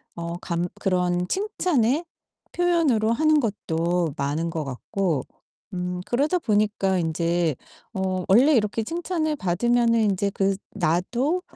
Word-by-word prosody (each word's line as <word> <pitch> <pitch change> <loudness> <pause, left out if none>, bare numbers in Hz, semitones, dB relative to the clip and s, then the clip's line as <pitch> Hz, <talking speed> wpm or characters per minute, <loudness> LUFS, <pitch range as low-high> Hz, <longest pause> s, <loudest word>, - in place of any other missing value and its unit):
어 170 0 -4
감 170 0 -2
그런 180 -2 +1
칭찬의 345 - +1 0.5
표현으로 310 -11 +2
하는 310 +3 +3
것도 170 - -1
많은 150 +4 -1
것 160 -2 -3
같고 150 +3 -2 0.5
음 180 0 -3
그러다 290 +9 +1
보니까 210 - +1
인제 165 -1 0 0.4
어 190 -2 -1
원래 255 +10 +5
이렇게 215 0 +1
칭찬을 325 0 -2
받으면은 230 +5 +2
인제 200 -1 +1
그 195 0 0 0.2
나도 235 - 0
195 Hz, 245 characters per minute, -24 LUFS, 175-255 Hz, 0.5 s, 원래